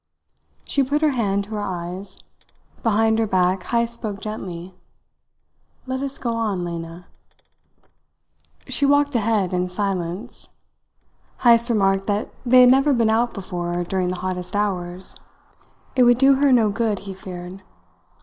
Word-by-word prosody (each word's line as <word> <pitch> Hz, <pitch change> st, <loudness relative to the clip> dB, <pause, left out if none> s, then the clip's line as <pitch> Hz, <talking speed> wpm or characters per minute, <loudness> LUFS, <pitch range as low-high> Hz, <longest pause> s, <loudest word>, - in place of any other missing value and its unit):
She 280 Hz, -, 0 dB
put 285 Hz, +3 st, 0 dB
her 305 Hz, -, +4 dB
hand 200 Hz, -6 st, 0 dB
to 205 Hz, -, -13 dB
her 210 Hz, -1 st, -3 dB
eyes. 185 Hz, +1 st, -6 dB, 0.6 s
Behind 220 Hz, 0 st, +2 dB
her 225 Hz, -, +1 dB
back 185 Hz, -1 st, +1 dB
Heyst 235 Hz, 0 st, 0 dB
spoke 215 Hz, -4 st, -5 dB
gently. 185 Hz, -4 st, -6 dB, 1.1 s
"Let 260 Hz, 0 st, -3 dB
us 275 Hz, 0 st, -3 dB
get 235 Hz, -, -2 dB
on, 215 Hz, -6 st, -1 dB
Lena." 170 Hz, 0 st, -7 dB, 1.6 s
She -, -, 0 dB
walked 285 Hz, 0 st, +3 dB
ahead 215 Hz, -5 st, +1 dB
in 180 Hz, 0 st, 0 dB
silence. 190 Hz, +2 st, -4 dB, 0.9 s
Heyst 235 Hz, 0 st, +5 dB
remarked 195 Hz, -3 st, +1 dB
that 205 Hz, 0 st, -1 dB
they 255 Hz, 0 st, +6 dB
had 250 Hz, 0 st, +7 dB
never 270 Hz, +2 st, +4 dB
been 230 Hz, -3 st, +2 dB
out 235 Hz, +2 st, +1 dB
before 175 Hz, -3 st, -3 dB
during 185 Hz, +1 st, -1 dB
the 180 Hz, -, -2 dB
hottest 180 Hz, 0 st, -4 dB
hours. 185 Hz, -3 st, -2 dB, 0.8 s
It 255 Hz, -, +3 dB
would 245 Hz, -1 st, +6 dB
do 270 Hz, +2 st, +6 dB
her 275 Hz, +1 st, +3 dB
no 225 Hz, -4 st, +4 dB
good, 220 Hz, -1 st, 0 dB
he 195 Hz, -, -6 dB
feared. 185 Hz, 0 st, -9 dB
205 Hz, 145 wpm, -22 LUFS, 185-235 Hz, 1.6 s, had